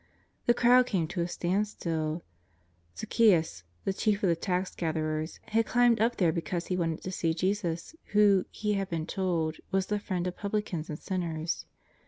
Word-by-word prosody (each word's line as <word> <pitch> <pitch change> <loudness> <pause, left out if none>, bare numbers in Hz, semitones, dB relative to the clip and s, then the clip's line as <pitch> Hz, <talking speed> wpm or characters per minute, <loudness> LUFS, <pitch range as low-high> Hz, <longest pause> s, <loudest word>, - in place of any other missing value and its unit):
The 240 - +5
crowd 250 +1 +5
came 175 -8 0
to 175 - -2
a 170 - 0
standstill. 175 -3 -1 0.7
Zaccheus, 170 - +3 0.2
the 195 - 0
chief 210 +1 0
of 190 - +4
the 170 - +3
tax 180 +2 -1
gatherers, 155 -1 -2
had 225 0 +2
climbed 240 -3 +4
up 235 +2 +3
there 175 -4 +3
be 170 - -2
cause 170 +2 -3
he 185 - -1
wanted 165 -3 -1
to 185 - -4
see 165 -3 0
Jesus, 185 - -1
who, 205 -2 +4
he 210 -1 -2
had 195 -1 -1
been 165 -2 -2
told, 170 -4 -1
was 190 0 +1
the 210 +1 -1
Priend 185 -3 -2
of 180 0 -3
publicans 200 -6 -3
and 150 - -4
sinners. 165 -3 -3
180 Hz, 180 wpm, -29 LUFS, 165-205 Hz, 0.7 s, The